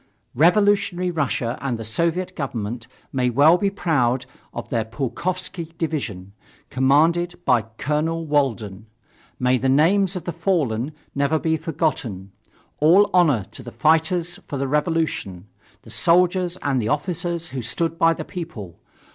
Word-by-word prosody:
"Revolutionary 180 Hz, -, +3 dB
Russia 125 Hz, -7 st, -1 dB
and 130 Hz, -3 st, -2 dB
the 115 Hz, -, -6 dB
Soviet 170 Hz, +10 st, -1 dB
Government 120 Hz, -4 st, -4 dB, 0.3 s
may 125 Hz, -2 st, +1 dB
well 150 Hz, +8 st, +5 dB
be 200 Hz, -, +2 dB
proud 130 Hz, -10 st, 0 dB, 0.3 s
of -, -, -7 dB
their 115 Hz, -2 st, 0 dB
Pulkovsky 165 Hz, +8 st, -4 dB
division, 105 Hz, -, -4 dB, 0.4 s
commanded 160 Hz, +7 st, +2 dB
by 120 Hz, -4 st, +3 dB
Colonel 160 Hz, +3 st, -1 dB
Walden. 115 Hz, -9 st, -1 dB, 0.5 s
May 125 Hz, 0 st, +2 dB
the 130 Hz, -, 0 dB
names 180 Hz, +7 st, +3 dB
of 180 Hz, -, -4 dB
the 175 Hz, -, -3 dB
fallen 155 Hz, -, 0 dB, 0.2 s
never 140 Hz, +3 st, +1 dB
be 160 Hz, +1 st, 0 dB
forgotten. 145 Hz, -, -2 dB, 0.5 s
All 180 Hz, +7 st, +5 dB
honor 155 Hz, -, +4 dB
to -, -, -8 dB
the -, -, -9 dB
fighters 165 Hz, +3 st, +1 dB
for 140 Hz, -, -4 dB
the 135 Hz, 0 st, -1 dB
revolution 150 Hz, -, -1 dB, 0.4 s
the -, -, -13 dB
soldiers 180 Hz, +1 st, +2 dB
and 135 Hz, -3 st, +1 dB
the 110 Hz, -, -2 dB
officers 170 Hz, +3 st, -2 dB
who 130 Hz, -, -4 dB
stood 165 Hz, +8 st, -2 dB
by 165 Hz, -2 st, +4 dB
the -, -, -6 dB
People! 140 Hz, -, -8 dB
155 Hz, 140 wpm, -22 LUFS, 125-170 Hz, 0.5 s, well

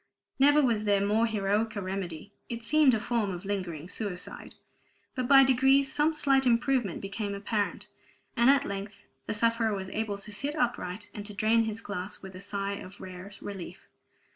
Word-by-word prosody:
Never 290 Hz, +2 st, +6 dB
was 230 Hz, -5 st, +2 dB
more 205 Hz, +2 st, +2 dB
heroic 215 Hz, +1 st, 0 dB
remedy; 190 Hz, -2 st, -5 dB, 0.2 s
it 235 Hz, -1 st, -5 dB
seemed 280 Hz, +1 st, +4 dB
a -, -, -1 dB
form 220 Hz, -1 st, 0 dB
of 180 Hz, 0 st, -6 dB
lingering 180 Hz, -6 st, -3 dB
suicide; 195 Hz, -3 st, -5 dB, 0.6 s
but 255 Hz, -3 st, -2 dB
by 270 Hz, 0 st, +8 dB
degrees 270 Hz, +1 st, +4 dB
some 305 Hz, +2 st, +2 dB
slight 275 Hz, -3 st, +3 dB
improvement 240 Hz, -4 st, +1 dB
became 200 Hz, +1 st, -4 dB
apparent, 205 Hz, +1 st, -2 dB, 0.5 s
and 235 Hz, +1 st, +5 dB
at 280 Hz, 0 st, +4 dB
length 200 Hz, 0 st, -6 dB, 0.2 s
the -, -, -1 dB
sufferer 230 Hz, -1 st, +2 dB
was 190 Hz, -1 st, -5 dB
able 215 Hz, -2 st, -2 dB
to 205 Hz, +1 st, -7 dB
sit 285 Hz, +8 st, -1 dB
upright, 205 Hz, -, -2 dB
and 205 Hz, -, -6 dB
to 210 Hz, -, -8 dB
drain 225 Hz, +2 st, +3 dB
his 220 Hz, 0 st, -3 dB
glass 200 Hz, -2 st, -6 dB
with 190 Hz, 0 st, -9 dB
a 185 Hz, -, -8 dB
sigh 200 Hz, 0 st, -3 dB
of 185 Hz, +1 st, -11 dB
rare 185 Hz, +1 st, -9 dB
relief. 195 Hz, -3 st, -8 dB
210 Hz, 170 wpm, -29 LUFS, 195-240 Hz, 0.6 s, by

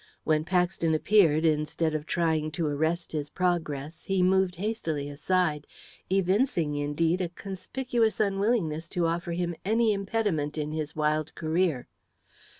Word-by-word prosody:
When 155 Hz, 0 st, +1 dB
Paxton 175 Hz, -2 st, +1 dB
appeared, 165 Hz, -3 st, +4 dB
instead 155 Hz, +1 st, +1 dB
of 155 Hz, 0 st, -3 dB
trying 160 Hz, -3 st, +1 dB
to 165 Hz, 0 st, -1 dB
arrest 160 Hz, +4 st, -1 dB
his 150 Hz, -2 st, -3 dB
progress, 160 Hz, -4 st, -2 dB
he 195 Hz, -2 st, +1 dB
moved 190 Hz, 0 st, +3 dB
hastily 170 Hz, -7 st, -2 dB
aside, 150 Hz, +1 st, 0 dB, 0.4 s
evincing, 190 Hz, -, +2 dB
indeed, 150 Hz, +5 st, 0 dB
a 175 Hz, -, -1 dB
conspicuous 220 Hz, +6 st, -2 dB
unwillingness 195 Hz, -6 st, 0 dB
to 175 Hz, -, +3 dB
offer 170 Hz, +1 st, -1 dB
him 175 Hz, 0 st, -1 dB
any 220 Hz, +2 st, +2 dB
impediment 195 Hz, -7 st, -1 dB
in 150 Hz, 0 st, -2 dB
his 155 Hz, -1 st, -4 dB
wild 155 Hz, 0 st, 0 dB
career. 160 Hz, -4 st, 0 dB
170 Hz, 135 wpm, -28 LUFS, 155-190 Hz, 0.4 s, appeared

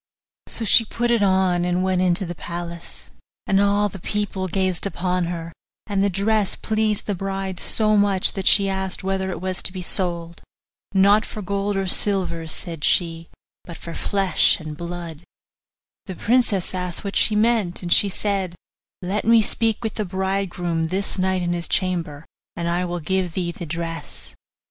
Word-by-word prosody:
So 225 Hz, -, -2 dB
she 230 Hz, -, +6 dB
put 235 Hz, +2 st, -2 dB
it 235 Hz, -2 st, +3 dB
on, 190 Hz, -3 st, +2 dB
and 180 Hz, +1 st, 0 dB
went 185 Hz, -1 st, +1 dB
into 185 Hz, +2 st, +2 dB
the 175 Hz, -, -5 dB
palace, 170 Hz, 0 st, -8 dB, 0.3 s
and 195 Hz, 0 st, +3 dB
all 205 Hz, +1 st, +3 dB
the 195 Hz, -1 st, -9 dB
people 200 Hz, 0 st, -2 dB
gazed 185 Hz, 0 st, +1 dB
upon 180 Hz, -2 st, -1 dB
her; 170 Hz, -1 st, -5 dB, 0.3 s
and 200 Hz, -2 st, 0 dB
the 200 Hz, -, +3 dB
dress 200 Hz, +2 st, +1 dB
pleased 215 Hz, -1 st, 0 dB
the 205 Hz, -, -1 dB
bride 195 Hz, -1 st, -4 dB
so 215 Hz, -1 st, +1 dB
much 200 Hz, -2 st, +3 dB
that 195 Hz, -2 st, -3 dB
she 200 Hz, -1 st, +5 dB
asked 190 Hz, -1 st, -3 dB
whether 190 Hz, 0 st, -1 dB
it 185 Hz, -, -4 dB
was 185 Hz, 0 st, -3 dB
to -, -, -1 dB
be 185 Hz, -1 st, -6 dB
sold. 170 Hz, -2 st, -1 dB, 0.5 s
'Not 200 Hz, +2 st, +5 dB
for 210 Hz, -, -7 dB
gold 200 Hz, +1 st, -1 dB
and 195 Hz, -1 st, -1 dB
silver.' 175 Hz, -5 st, +2 dB
said 165 Hz, -1 st, -4 dB
she, 165 Hz, -2 st, +1 dB, 0.3 s
'but 170 Hz, -2 st, -9 dB
for 170 Hz, -, -8 dB
flesh 195 Hz, -1 st, +2 dB
and 155 Hz, -2 st, -7 dB
blood.' 170 Hz, -1 st, -7 dB, 0.8 s
The 190 Hz, -, -6 dB
princess 220 Hz, -4 st, +1 dB
asked 180 Hz, 0 st, -3 dB
what 200 Hz, -1 st, -5 dB
she 215 Hz, -, +3 dB
meant, 210 Hz, -5 st, +2 dB
and 175 Hz, -, +3 dB
she 200 Hz, -, +5 dB
said, 195 Hz, -2 st, -2 dB, 0.5 s
'Let 195 Hz, +4 st, -1 dB
me 230 Hz, -1 st, +5 dB
speak 225 Hz, +1 st, +2 dB
with 220 Hz, -, -2 dB
the 215 Hz, -, -2 dB
bridegroom 185 Hz, -3 st, -2 dB
this 190 Hz, +3 st, -2 dB
night 185 Hz, -1 st, +1 dB
in 175 Hz, 0 st, 0 dB
his 170 Hz, -1 st, -2 dB
chamber, 170 Hz, -5 st, -2 dB, 0.3 s
and 170 Hz, 0 st, -3 dB
I 175 Hz, +1 st, 0 dB
will 175 Hz, 0 st, -3 dB
give 185 Hz, +2 st, -1 dB
thee 175 Hz, -2 st, -1 dB
the 170 Hz, 0 st, -8 dB
dress. 150 Hz, -, -6 dB
185 Hz, 175 wpm, -22 LUFS, 175-200 Hz, 0.8 s, she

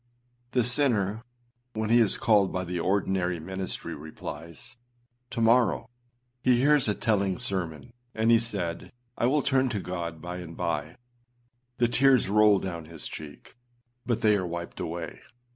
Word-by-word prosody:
â 120 Hz, 0 st, -42 dB
The 125 Hz, -, +3 dB
sinner, 115 Hz, -5 st, +1 dB, 0.5 s
when 110 Hz, 0 st, -2 dB
he 120 Hz, -, +6 dB
is 110 Hz, -3 st, +3 dB
called 105 Hz, -4 st, +3 dB
by 90 Hz, -, -2 dB
the 90 Hz, 0 st, -3 dB
ordinary 95 Hz, -1 st, 0 dB
ministry, 95 Hz, +3 st, -5 dB
replies, 80 Hz, -, -9 dB, 0.5 s
âTo 115 Hz, -, -2 dB
morrow.â 115 Hz, +1 st, +3 dB, 0.6 s
He 125 Hz, 0 st, +4 dB
hears 145 Hz, +1 st, +4 dB
a 105 Hz, -, +1 dB
telling 100 Hz, -5 st, +1 dB
sermon, 95 Hz, +3 st, -2 dB, 0.2 s
and 110 Hz, +1 st, +3 dB
he 115 Hz, -, +6 dB
said, 100 Hz, -7 st, -3 dB, 0.3 s
âI 120 Hz, -, +3 dB
will 145 Hz, 0 st, +2 dB
turn 130 Hz, -1 st, +2 dB
to 105 Hz, -, -2 dB
God 85 Hz, -3 st, -5 dB
by 90 Hz, +2 st, -6 dB
and 85 Hz, -2 st, -9 dB
bye.â 75 Hz, -2 st, -2 dB, 0.8 s
The 120 Hz, -1 st, +3 dB
tears 130 Hz, -3 st, +4 dB
roll 105 Hz, 0 st, +5 dB
down 85 Hz, -4 st, -5 dB
his 80 Hz, -1 st, -9 dB
cheek, 75 Hz, -2 st, -10 dB, 0.5 s
but 120 Hz, -2 st, -1 dB
they 105 Hz, -2 st, +4 dB
are 95 Hz, -3 st, -1 dB
wiped 85 Hz, 0 st, -6 dB
away. 85 Hz, +1 st, -5 dB
100 Hz, 160 wpm, -27 LUFS, 85-120 Hz, 0.8 s, he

